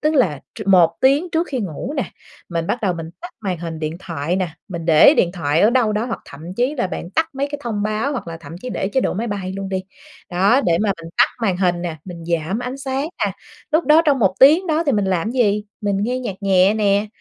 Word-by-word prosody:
tức 305 Hz, +1 st, +1 dB
là 180 Hz, -, +2 dB
tr 215 Hz, -, -6 dB
1 175 Hz, -4 st, +5 dB
tiếng 280 Hz, +7 st, +3 dB
trước 330 Hz, +2 st, +1 dB
khi 260 Hz, -4 st, -2 dB
ngủ 195 Hz, -, -4 dB
nè, 265 Hz, -, 0 dB, 0.4 s
mình 165 Hz, -1 st, -2 dB
bắt 245 Hz, -, -1 dB
đầu 185 Hz, -3 st, +1 dB
mình 165 Hz, -1 st, -7 dB
tắt 355 Hz, -, -7 dB
màn 185 Hz, -5 st, -3 dB
hình 165 Hz, -1 st, -5 dB
điện 155 Hz, +1 st, -3 dB
thoại 170 Hz, -2 st, -3 dB
nè, 185 Hz, -3 st, -1 dB, 0.2 s
mình 170 Hz, -4 st, -5 dB
để 160 Hz, -2 st, +7 dB
điện 175 Hz, 0 st, +2 dB
thoại 160 Hz, -2 st, 0 dB
ở 215 Hz, -, +5 dB
đâu 240 Hz, -4 st, +2 dB
đó 210 Hz, +2 st, 0 dB
hoặc 230 Hz, -, -4 dB
thậm 160 Hz, +6 st, -9 dB
chí 250 Hz, +7 st, 0 dB
là 240 Hz, -8 st, 0 dB
bạn 180 Hz, -1 st, -6 dB
tắt 320 Hz, +5 st, +1 dB
mấy 275 Hz, +1 st, -1 dB
cái 290 Hz, -, -4 dB
thông 215 Hz, -4 st, -2 dB
báo 215 Hz, +7 st, -1 dB
hoặc 240 Hz, -9 st, -5 dB
là 165 Hz, -, -6 dB
thậm 165 Hz, 0 st, -9 dB
chí 255 Hz, -, -5 dB
để 190 Hz, -, -2 dB
chế 265 Hz, +6 st, +1 dB
độ -, -, -1 dB
máy 220 Hz, +5 st, -2 dB
bay 195 Hz, -4 st, -4 dB
luôn 195 Hz, 0 st, -5 dB
đi. 190 Hz, -1 st, -2 dB, 0.5 s
Đó, 195 Hz, +9 st, +3 dB
để 170 Hz, -8 st, +2 dB
mà 205 Hz, -, +2 dB
mình 165 Hz, -, -9 dB
tắt -, -, +7 dB, 0.2 s
màn 195 Hz, -5 st, +1 dB
hình 180 Hz, -2 st, +1 dB
nè, 165 Hz, -2 st, -4 dB
mình 170 Hz, -3 st, -9 dB
giảm 170 Hz, +4 st, -1 dB
ánh 250 Hz, +2 st, -4 dB
sáng 275 Hz, +2 st, -2 dB, 0.2 s
nè, -, -, -1 dB, 0.4 s
lúc 320 Hz, +2 st, +3 dB
đó 310 Hz, +2 st, +6 dB
trong 280 Hz, -2 st, +4 dB
1 190 Hz, -5 st, +2 dB
tiếng 310 Hz, +8 st, +7 dB
đó 320 Hz, 0 st, +1 dB
thì 280 Hz, -, +3 dB
mình 205 Hz, -3 st, +1 dB
làm 190 Hz, +2 st, 0 dB
gì? 210 Hz, -5 st, +1 dB, 0.2 s
Mình 200 Hz, -1 st, 0 dB
nghe 250 Hz, +4 st, -1 dB
nhạc 210 Hz, -7 st, -4 dB
nhẹ 195 Hz, +1 st, +4 dB
nè, 205 Hz, -1 st, +2 dB
200 Hz, 260 wpm, -20 LUFS, 175-255 Hz, 0.5 s, để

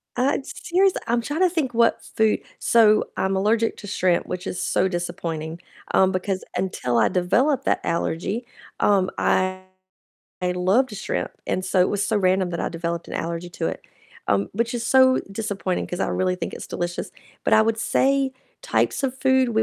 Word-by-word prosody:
Uh, 260 Hz, +3 st, +2 dB
it's 270 Hz, -, -6 dB
serious 375 Hz, +2 st, +4 dB
I'm 235 Hz, 0 st, +1 dB
trying 295 Hz, +8 st, -3 dB
to 365 Hz, -, +5 dB
think 300 Hz, -8 st, -1 dB
what 230 Hz, 0 st, +2 dB
food 220 Hz, -1 st, +3 dB, 0.2 s
so 215 Hz, -2 st, +4 dB
I'm 190 Hz, 0 st, 0 dB
allergic 220 Hz, +4 st, +1 dB
to 205 Hz, -, -9 dB
shrimp, 180 Hz, -2 st, +1 dB
which 180 Hz, +1 st, -5 dB
is 180 Hz, -, -4 dB
so -, -, +1 dB
disappointing, 170 Hz, -2 st, -4 dB, 0.3 s
um, 190 Hz, 0 st, +4 dB
because 185 Hz, 0 st, -2 dB
until 125 Hz, -10 st, -1 dB
I 115 Hz, -, +4 dB
developed 240 Hz, +11 st, +1 dB
that -, -, +1 dB
allergy, 175 Hz, +7 st, -2 dB, 0.3 s
um, 195 Hz, -2 st, +3 dB
I 185 Hz, 0 st, +1 dB, 0.8 s
I 180 Hz, 0 st, 0 dB
loved 205 Hz, +7 st, +2 dB
shrimp, -, -, -3 dB
and 185 Hz, -, -1 dB
so 185 Hz, 0 st, +1 dB
it 180 Hz, -, +4 dB
was 205 Hz, -1 st, 0 dB
so 220 Hz, -, +1 dB
random 185 Hz, -1 st, +2 dB
that 170 Hz, -, -3 dB
I -, -, -1 dB
developed 170 Hz, 0 st, -4 dB
an -, -, -7 dB
allergy 170 Hz, +1 st, -4 dB
to 170 Hz, -, -3 dB
it, 80 Hz, -, -4 dB, 0.5 s
um, 100 Hz, +1 st, +2 dB
which 235 Hz, +4 st, -1 dB
is 235 Hz, -1 st, -3 dB
so 260 Hz, -1 st, +5 dB
disappointing, 200 Hz, -3 st, -2 dB
'cause 180 Hz, -, -5 dB
I -, -, +1 dB
really 185 Hz, -1 st, 0 dB
think -, -, -4 dB
it's -, -, -8 dB
delicious, 175 Hz, +1 st, -4 dB, 0.3 s
but -, -, +1 dB
I -, -, +7 dB
would 220 Hz, 0 st, +2 dB
say 270 Hz, +3 st, +1 dB, 0.3 s
types -, -, 0 dB
of 265 Hz, -1 st, -2 dB
food 260 Hz, -1 st, +3 dB
195 Hz, 185 wpm, -23 LUFS, 180-240 Hz, 0.8 s, I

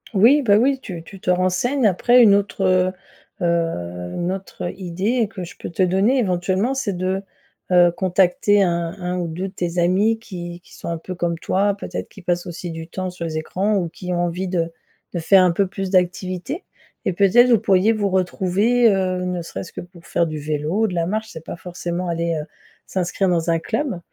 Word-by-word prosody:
Oui 245 Hz, +10 st, +6 dB
bah 205 Hz, -6 st, +4 dB
oui 265 Hz, +4 st, +2 dB
tu 175 Hz, -6 st, -7 dB
tu 195 Hz, +3 st, -12 dB
te 180 Hz, -, -4 dB
renseignes. 185 Hz, +9 st, +1 dB
Après 240 Hz, +5 st, +5 dB
une 205 Hz, -3 st, +7 dB
autre, 200 Hz, -1 st, 0 dB
heu 185 Hz, 0 st, +3 dB, 0.5 s
heu, 90 Hz, -, -1 dB
une 175 Hz, +1 st, -1 dB
autre, 190 Hz, -2 st, -6 dB
heu, 175 Hz, -, -3 dB
idée 195 Hz, +6 st, -1 dB
que 185 Hz, -4 st, -6 dB
je 175 Hz, -, -9 dB
peux -, -, -6 dB
te 170 Hz, +2 st, 0 dB
donner 195 Hz, +9 st, +3 dB
éventuellement 190 Hz, +3 st, +1 dB
c'est 245 Hz, -8 st, -2 dB
de, 185 Hz, +2 st, -1 dB, 0.5 s
heu, 175 Hz, -1 st, +6 dB
contacter 190 Hz, +3 st, +3 dB
un 170 Hz, 0 st, -1 dB
un 180 Hz, 0 st, -2 dB
ou 175 Hz, -, -2 dB
2 180 Hz, +4 st, -4 dB
de -, -, -19 dB
tes 175 Hz, -1 st, -3 dB
amis 195 Hz, +6 st, +3 dB
qui 175 Hz, -5 st, -8 dB
qui -, -, -20 dB
sont -, -, -9 dB
un 170 Hz, -, -2 dB
peu 185 Hz, +3 st, -7 dB
comme 170 Hz, -2 st, -1 dB
toi, 200 Hz, +4 st, +1 dB
peut-être -, -, -6 dB
qui 195 Hz, -4 st, -14 dB
passent 175 Hz, 0 st, -1 dB
aussi 175 Hz, 0 st, -6 dB
du 160 Hz, 0 st, -7 dB
temps 185 Hz, +1 st, -4 dB
sur 175 Hz, -2 st, -6 dB
les 155 Hz, -1 st, -3 dB
écrans 195 Hz, +6 st, -1 dB
ou 175 Hz, -3 st, 0 dB
qui 180 Hz, +2 st, -7 dB
ont 175 Hz, 0 st, +1 dB
envie 180 Hz, +2 st, -3 dB
de 170 Hz, -2 st, -1 dB, 0.4 s
de 175 Hz, -, -1 dB
faire 185 Hz, +3 st, +5 dB
un 180 Hz, -, +4 dB
peu 195 Hz, +2 st, +1 dB
plus 195 Hz, 0 st, -4 dB
d'activité 185 Hz, -, 0 dB, 0.4 s
et -, -, +1 dB
peut-être, 205 Hz, +7 st, +5 dB
vous 230 Hz, -4 st, +5 dB
pourriez 195 Hz, +4 st, +3 dB
vous 205 Hz, -2 st, 0 dB
retrouver, 190 Hz, +6 st, +2 dB
heu, 185 Hz, -1 st, 0 dB
ne 180 Hz, -1 st, -2 dB
serait-ce 170 Hz, +1 st, -7 dB
que -, -, -8 dB
pour 175 Hz, -1 st, -15 dB
faire 170 Hz, -, +1 dB
du 155 Hz, -1 st, -4 dB
vélo 150 Hz, +6 st, -1 dB
ou 220 Hz, -, +4 dB
de 185 Hz, -, -5 dB
la 170 Hz, -1 st, 0 dB
marche, 220 Hz, +4 st, -2 dB
c'est 160 Hz, -4 st, -10 dB
pas -, -, -6 dB
forcément 175 Hz, 0 st, -4 dB
aller, 170 Hz, 0 st, -1 dB
heu, 150 Hz, -, -4 dB, 0.4 s
s'inscrire 185 Hz, +1 st, 0 dB
dans 170 Hz, -1 st, +1 dB
un 165 Hz, -, +3 dB
club 225 Hz, -, -2 dB
185 Hz, 215 wpm, -21 LUFS, 175-200 Hz, 0.5 s, une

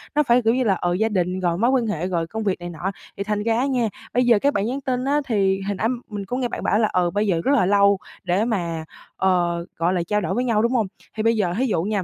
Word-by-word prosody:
Nó 300 Hz, -, +4 dB
phải 245 Hz, -2 st, +4 dB
kiểu 225 Hz, 0 st, +2 dB
như 260 Hz, -, +1 dB
là, 210 Hz, -5 st, +3 dB
ờ, 175 Hz, 0 st, -1 dB
gia 220 Hz, +5 st, +1 dB
đình 185 Hz, -2 st, -1 dB
rồi 175 Hz, -2 st, 0 dB
mối 230 Hz, +6 st, +2 dB
quan 250 Hz, -4 st, +1 dB
hệ, 180 Hz, -3 st, -2 dB
rồi 170 Hz, -3 st, -1 dB
công 220 Hz, +5 st, -4 dB
việc 195 Hz, -3 st, -1 dB
này 175 Hz, 0 st, -6 dB
nọ. 175 Hz, +3 st, -4 dB, 0.3 s
Thì 200 Hz, -, -2 dB
thành 210 Hz, 0 st, -2 dB
ra 225 Hz, 0 st, +1 dB
á 255 Hz, -, +1 dB
nha, 250 Hz, -5 st, +1 dB, 0.2 s
bây 250 Hz, +1 st, +2 dB
giờ 235 Hz, -3 st, +5 dB
các 285 Hz, +6 st, +2 dB
bạn 200 Hz, -, 0 dB
nhắn 260 Hz, +5 st, -3 dB
tin 255 Hz, -1 st, -2 dB
á, 290 Hz, +2 st, +2 dB
thì 195 Hz, -4 st, +1 dB
hồi 200 Hz, -, -1 dB
nãy 215 Hz, +4 st, 0 dB, 0.2 s
mình 205 Hz, -2 st, -5 dB
có 245 Hz, +6 st, -3 dB
nghe 255 Hz, -, 0 dB
bạn -, -, -6 dB
bảo 210 Hz, -, +2 dB
là, 220 Hz, -, +3 dB
ờ, 180 Hz, -1 st, +2 dB
bây 205 Hz, +1 st, 0 dB
giờ 170 Hz, -4 st, +1 dB
rất 270 Hz, -, +2 dB
là 235 Hz, -, +3 dB
lâu 200 Hz, +1 st, +4 dB, 0.3 s
để 185 Hz, +4 st, +1 dB
mà, 170 Hz, -8 st, -2 dB, 0.3 s
ờ, 175 Hz, -2 st, +1 dB
gọi 170 Hz, +2 st, +1 dB
là, 180 Hz, -, 0 dB
trao 210 Hz, 0 st, +1 dB
đổi 165 Hz, -, -2 dB
với 245 Hz, -, 0 dB
nhau, 230 Hz, -4 st, +2 dB
đúng 235 Hz, -, +1 dB
hông? 225 Hz, -6 st, +1 dB, 0.3 s
Thì 215 Hz, -, -1 dB
bây 230 Hz, +1 st, +3 dB
giờ 190 Hz, -5 st, 0 dB
thí 260 Hz, -, +1 dB
dụ 205 Hz, -9 st, 0 dB
nha, 205 Hz, -1 st, -1 dB
210 Hz, 305 wpm, -22 LUFS, 185-235 Hz, 0.3 s, giờ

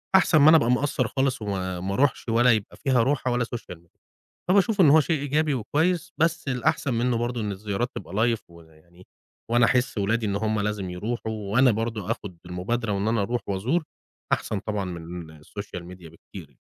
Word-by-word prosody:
أحسن 180 Hz, -3 st, +5 dB
ما 150 Hz, +1 st, +7 dB
أنا 160 Hz, -, +8 dB
أبقى 120 Hz, -5 st, +2 dB
مقصّر 130 Hz, -1 st, +1 dB
خالص 135 Hz, 0 st, -1 dB
وما 95 Hz, -3 st, -3 dB
ما 95 Hz, +2 st, -3 dB
أروحش 130 Hz, +1 st, +1 dB
ولا 120 Hz, +2 st, +4 dB
يبقى 110 Hz, -3 st, -1 dB
فيها 130 Hz, -5 st, +2 dB
روحة 130 Hz, 0 st, 0 dB
ولا 120 Hz, 0 st, +1 dB
social 100 Hz, -6 st, -8 dB
media 85 Hz, 0 st, -29 dB, 0.5 s
فباشوف 200 Hz, +2 st, +4 dB
إن 160 Hz, -, +7 dB
هو 155 Hz, +3 st, +7 dB
شيء 155 Hz, +1 st, 0 dB
إيجابي 150 Hz, +1 st, +1 dB
وكويس، 165 Hz, -, 0 dB
بس 165 Hz, -1 st, 0 dB
الأحسن 125 Hz, +1 st, 0 dB
منه 120 Hz, +1 st, +1 dB
برضو 120 Hz, +1 st, -2 dB
إن 105 Hz, -1 st, -2 dB
الزيارات 100 Hz, +4 st, -3 dB
تبقى 95 Hz, -, -8 dB
live، 115 Hz, +2 st, +2 dB
ويعني 85 Hz, +1 st, -18 dB, 0.4 s
وأنا 120 Hz, 0 st, +5 dB
أحس 125 Hz, 0 st, +1 dB
ولادي 110 Hz, +3 st, 0 dB
إن 100 Hz, -1 st, -1 dB
هُم 110 Hz, +1 st, 0 dB
لازم 105 Hz, -2 st, -2 dB
يروحوا، 110 Hz, +5 st, -4 dB, 0.2 s
وأنا 125 Hz, +2 st, +5 dB
برضو 110 Hz, -2 st, -3 dB
آخد 95 Hz, -4 st, -6 dB
المبادرة 100 Hz, +6 st, -2 dB
وإن 100 Hz, +1 st, -1 dB
أنا 110 Hz, -1 st, +1 dB
أروح 120 Hz, +4 st, -1 dB
وأزور 115 Hz, -, 0 dB, 0.5 s
أحسن 105 Hz, -, -1 dB
طبعًا 105 Hz, -1 st, -3 dB
من 85 Hz, -2 st, -8 dB
الsocial 100 Hz, +2 st, -7 dB
media 90 Hz, -2 st, -12 dB
بكتير. 80 Hz, -3 st, -13 dB
115 Hz, 185 wpm, -25 LUFS, 95-130 Hz, 0.5 s, أنا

